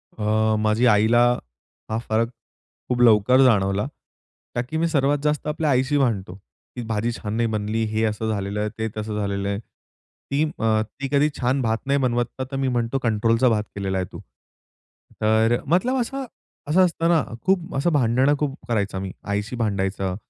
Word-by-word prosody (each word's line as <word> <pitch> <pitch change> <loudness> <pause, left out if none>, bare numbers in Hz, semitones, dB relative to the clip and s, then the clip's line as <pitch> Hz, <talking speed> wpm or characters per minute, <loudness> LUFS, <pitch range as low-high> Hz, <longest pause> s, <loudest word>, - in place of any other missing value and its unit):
अ, 110 0 +1
माझी 110 +3 +2
आईला 115 +1 +5 0.7
हा 110 - -1
फरक 115 +1 +1 0.6
खूप 125 -1 0
लवकर 120 +2 +5
जाणवला. 100 -4 +3 0.7
कारण 125 +6 -2
मी 170 - +2
सर्वात 145 -2 +2
जास्त 150 0 0
आपल्या 150 0 -1
आईशी 135 +2 +2
भांडतो. 105 -9 0 0.4
ती 125 - -4
भाजी 115 +2 -1
छान 105 -3 -5
नाही 115 0 +1
बनली, 110 +1 -1
हे 110 +1 -1
असं 110 +1 -2
झालेलं 100 -1 -2
आहे, 105 0 -1
ते 110 0 -1
तसं 110 0 -3
झालेलं 100 -1 -2
आहे. 100 - -2
ती 140 +5 -6 0.2
अ, 110 -1 +2
ती 135 +5 -7
कधी 145 +1 +3
छान 130 +2 +1
भात 115 -1 +1
नाही 140 0 +2
बनवत. 120 -2 +1 0.3
तर - - -4
मी 135 0 0
म्हणतो, 120 +1 0
कंट्रोलचा 115 +2 +2
भात 105 -2 +1
केलेला 95 -1 -2
आहे 95 - -1
तू. - - -9 1.0
तर 110 +2 +3
मतलब 185 - +2
असं, 270 +3 -4 0.4
असं 185 +5 +5
असतं 165 -1 0
ना, 160 -4 +4 0.2
खूप 185 -2 0
असं 140 +6 +1
भांडणं, 130 +1 +3
खूप 145 -2 -1
करायचा 100 -4 -1
मी 95 -1 -5 0.2
आईशी 105 +4 -2
भांडायचं. 95 -4 -1
115 Hz, 170 wpm, -23 LUFS, 105-135 Hz, 1.0 s, आईला